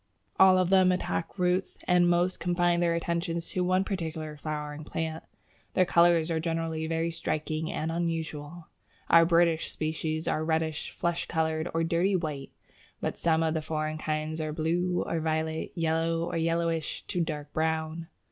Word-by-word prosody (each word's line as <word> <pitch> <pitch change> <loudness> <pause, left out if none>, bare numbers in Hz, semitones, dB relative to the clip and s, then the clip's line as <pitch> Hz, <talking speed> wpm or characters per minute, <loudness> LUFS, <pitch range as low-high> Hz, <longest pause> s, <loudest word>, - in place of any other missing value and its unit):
All 190 -1 +8
of 185 0 +2
them 185 -1 +6
attack 180 0 -2
roots, 180 +1 0
and 180 -1 +4
most 175 +1 +2
confine 175 0 +2
their 170 -1 +2
attentions 170 0 -2
to 180 - -1
one 185 +1 +2
particular 160 -5 -4
flowering 150 0 -5
plant. 160 +1 -4 0.5
Their 185 - +5
colours 170 -1 +4
are 160 - +1
generally 165 -1 -2
very 165 +1 0
striking 155 0 -2
and 160 +1 -2
unusual. 165 -1 -3 0.4
Our 165 0 +7
British 170 -1 +3
species 155 0 -3
are 155 - 0
reddish, 160 -1 -1
flesh 170 0 -2
coloured, 160 0 0
or 165 - +2
dirty 175 +4 +2
white, 150 -6 -3 0.5
but - - -2
some 165 -1 +2
of 160 -1 +1
the 160 - -1
foreign 155 0 -3
kinds 155 +1 -2
are 155 -1 -2
blue 175 +3 0
or 165 - -1
violet, 160 0 -1
yellow, 165 0 0
or 170 - -3
yellowish 165 -1 -1
to 180 - -2
dark 150 -3 -4
brown. 160 +1 -1
165 Hz, 160 wpm, -28 LUFS, 160-170 Hz, 0.5 s, All